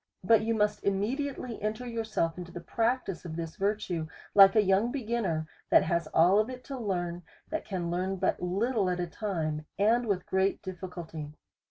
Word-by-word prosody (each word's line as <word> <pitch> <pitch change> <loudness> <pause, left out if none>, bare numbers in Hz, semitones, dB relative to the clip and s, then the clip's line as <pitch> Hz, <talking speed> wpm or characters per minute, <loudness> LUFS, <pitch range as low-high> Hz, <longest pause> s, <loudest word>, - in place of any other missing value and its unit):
But 225 +4 +5
you 225 +1 0
must 210 -1 +1
immediately 240 +5 -2
enter 215 +4 -2
your 230 -2 -3
self 165 -7 0
into 175 -1 -8
the 175 - -6
practice 225 +1 -1
of 165 -3 -6
this 165 -1 -5
virtue, 195 -5 -1 0.3
like 195 0 +8
a 215 - +6
young 200 +5 +3
be 270 -2 -3
ginner, 205 -9 0 0.2
that - - +6
has 170 -2 0
all 175 +6 +5
of 215 +3 +1
it 250 -1 -8
to 275 - -6
learn, 175 -5 -2 0.3
that 315 - -2
can 175 -4 -3
learn 185 +2 -1
but 185 -1 0
little 200 +3 +1
at 180 0 -1
a 175 - 0
time, 160 -6 -3
and 230 +4 +3
with 190 -3 0
great 190 +1 +1
difficulty. 175 -5 -7
195 Hz, 190 wpm, -29 LUFS, 175-225 Hz, 0.3 s, like